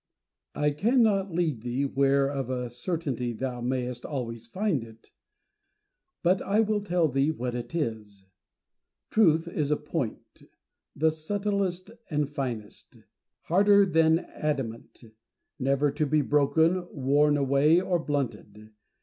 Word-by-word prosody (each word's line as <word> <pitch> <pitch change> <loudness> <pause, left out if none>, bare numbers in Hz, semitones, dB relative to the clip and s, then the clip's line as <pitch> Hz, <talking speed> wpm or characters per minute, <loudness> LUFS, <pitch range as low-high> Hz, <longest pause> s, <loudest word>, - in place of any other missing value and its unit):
Diogenes. 150 0 0
I - - -20
cannot 215 -4 +3
lead 165 -8 -1
thee 125 +4 -1
where 140 0 +2
of 135 -3 -3
a 125 -2 -3
certainty 125 -2 -3
thou 125 +1 -4
mayest 125 0 -2
always 115 -5 -5
find 185 - -1
it; 115 0 -16 1.1
but 180 +2 +3
I 205 +2 +1
will 215 -1 +1
tell 175 -4 +1
thee 135 +1 +1
what 125 -6 -3
it 120 +6 -6
is. 110 - -4 0.9
Truth 165 -6 +3
is 150 -4 -2
a 150 - +2
point; 150 -5 -5 0.5
the 160 +2 +2
subtilest 195 +3 -2 0.2
and 150 -2 0
finest; 125 -7 -6 0.5
harder 200 +3 +5
than 160 -3 +3
adamant; 135 -9 -5 0.6
never 140 +2 +1
to 150 +1 -1
be 155 +2 +2
broken, 160 +6 +2
worn 145 +2 +2
away, 140 +4 +4
or 180 -1 0
blunted. 120 -8 -4
145 Hz, 130 wpm, -27 LUFS, 125-170 Hz, 1.1 s, harder